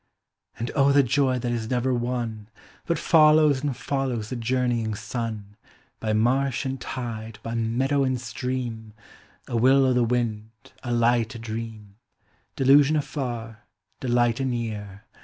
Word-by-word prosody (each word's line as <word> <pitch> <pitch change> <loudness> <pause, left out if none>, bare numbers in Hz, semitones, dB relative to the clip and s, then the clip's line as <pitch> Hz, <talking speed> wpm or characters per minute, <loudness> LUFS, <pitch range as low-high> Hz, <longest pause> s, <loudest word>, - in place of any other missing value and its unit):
And 115 - -3
oh 140 -1 +4
the 140 0 +5
joy 130 0 +2
that 120 -1 -2
is 115 -2 -3
never 125 +1 +1
won, 120 -3 -3 0.4
Uut 170 - +2
follows 155 -4 +5
and 140 -5 -2
follows 130 -6 -2
the - - -2
journeying 120 -2 0
sun, 110 -2 -5 0.4
By 110 - -2
marsh 130 +5 +1
and 135 0 -3
tide, 115 -3 -5
by 115 - -4
meadow 125 +5 +1
and 130 -1 0
stream, 120 -2 -4 0.5
A - - -4
will 130 +3 +5
o' 130 - +3
the 125 -1 +3
wind, 115 -2 -1 0.3
a 120 - -4
light 120 0 +2
o' - - -7
dream, 110 -2 -7 0.6
Delusion 140 +3 +5
afar, 120 -6 -4 0.3
delight 120 -1 +1
anear. 110 -6 -4
120 Hz, 140 wpm, -25 LUFS, 115-130 Hz, 0.6 s, the